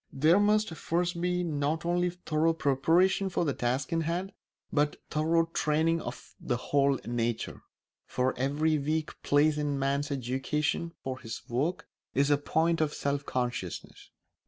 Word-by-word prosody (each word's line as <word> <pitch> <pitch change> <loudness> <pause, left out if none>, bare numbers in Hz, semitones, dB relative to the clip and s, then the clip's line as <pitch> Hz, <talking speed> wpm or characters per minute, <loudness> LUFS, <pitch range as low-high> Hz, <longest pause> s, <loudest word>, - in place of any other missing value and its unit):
There 155 +7 +4
must 210 -2 +2
first 170 +1 -1
be 180 0 0
not 155 0 -1
only 175 +1 +2
thorough 165 -2 0
preparation 165 +7 +2
for 175 - 0
the 140 - +1
task 130 +5 -1
in 165 - +2
hand 175 +4 -2 0.4
but 145 0 +2 0.2
thorough 165 +2 +2
training 160 +2 +1
of 120 - -8
the 120 - -1
whole 140 +1 +2
nature; 120 -1 -2 0.5
for 130 +1 0
every 150 +4 +1
weak 155 +2 -2
place 150 +1 +3
in 150 - 0
a 140 -1 -1
man's 140 +1 0
education 145 +5 -1
for 130 -1 -4
his 115 -2 -7
work 140 +9 -1 0.3
is 140 +2 +3
a 145 - +5
point 160 +3 +1
of 150 -1 0
self 140 0 -2
consciousness. 120 -8 -4
150 Hz, 155 wpm, -29 LUFS, 135-165 Hz, 0.5 s, a